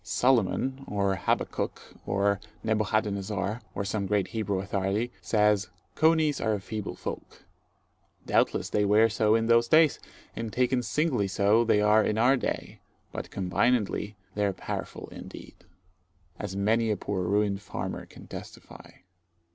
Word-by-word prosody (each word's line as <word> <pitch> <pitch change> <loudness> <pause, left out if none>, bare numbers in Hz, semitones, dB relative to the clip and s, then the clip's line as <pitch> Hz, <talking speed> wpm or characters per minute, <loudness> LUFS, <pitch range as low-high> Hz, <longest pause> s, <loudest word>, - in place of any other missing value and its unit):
Solomon, 130 +4 +1
or 100 -1 0
Habakkuk, 90 - -1 0.3
or 100 0 +1 0.2
Nebuchadnezzar, 105 -1 -1
or 100 - -2
some 100 -1 -2
great 100 -2 +1
Hebrew 105 -3 -2
authority, 100 +4 -1
says, 105 0 +2 0.2
"Coneys 160 -2 +3
are 110 - +1
a - - -4
feeble 105 +2 -5
folk." - - -8 0.8
Doubtless - - +1
they 105 - +2
were 105 +3 +5
so 110 0 +2
in 115 0 +1
those 115 0 +4
days, 155 0 +5 0.4
and 115 -1 -4
taken 125 +1 +1
singly 130 -6 0
so 100 +4 +3
they 110 -2 +3
are 105 +1 +5
in 105 - 0
our 125 +4 +5
day; 130 - -4 0.3
but - - -6
combinedly 105 +2 0 0.2
they 105 - -1
are 100 - 0
powerful - - -6
indeed, - - -10 0.9
as 95 - -5
many 110 +3 +2
a 105 - +1
poor 95 0 -3
ruined 100 +1 +1
farmer - - -5
can - - -14
testify. - - -10
105 Hz, 140 wpm, -28 LUFS, 100-115 Hz, 0.9 s, were